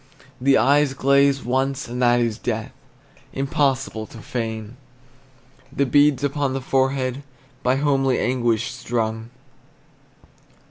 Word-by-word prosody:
The 135 +1 +4
eyes 140 +1 +3
glaze 140 +1 +3
once, 135 +2 -1
and 125 +1 -5
that 120 0 +4
is 115 -3 -1
death. - - -3 0.6
Impossible 135 -5 -1
to - - -13
feign 110 -1 -5 1.0
The 140 - 0
beads 145 +1 +3
upon 140 -1 -1
the - - -1
forehead 130 0 0 0.4
By 125 +1 +2
homely 135 -2 +1
anguish 120 -3 0
strung. 115 -2 -3
130 Hz, 110 wpm, -22 LUFS, 120-140 Hz, 1.0 s, The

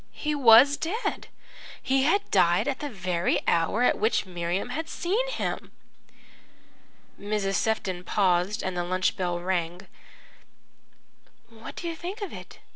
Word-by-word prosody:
He 300 0 -2
was 270 +1 +7
dead 420 +9 -3 0.5
he 270 0 +1
had 365 +9 +1
died 175 +2 +3
at 275 -2 -2
the 295 - -4
very 180 -5 -1
hour 170 +8 +2
at - - +2
which 220 0 +1
Miriam 175 +3 -3
had 320 +6 -4
seen 440 +8 -1
him." - - -4 1.5
Mrs. 205 -1 -2
Sefton 190 -5 -1
paused, 185 +2 +1
and 185 -1 -3
the 175 - -1
lunch 185 +1 0
bell 175 -2 -2
rang. 175 0 -2 1.6
"What 225 -1 -11
do 345 - -5
you 335 - -3
think 370 +6 -6
of 400 - -6
it?" - - -11
210 Hz, 140 wpm, -26 LUFS, 180-290 Hz, 1.6 s, was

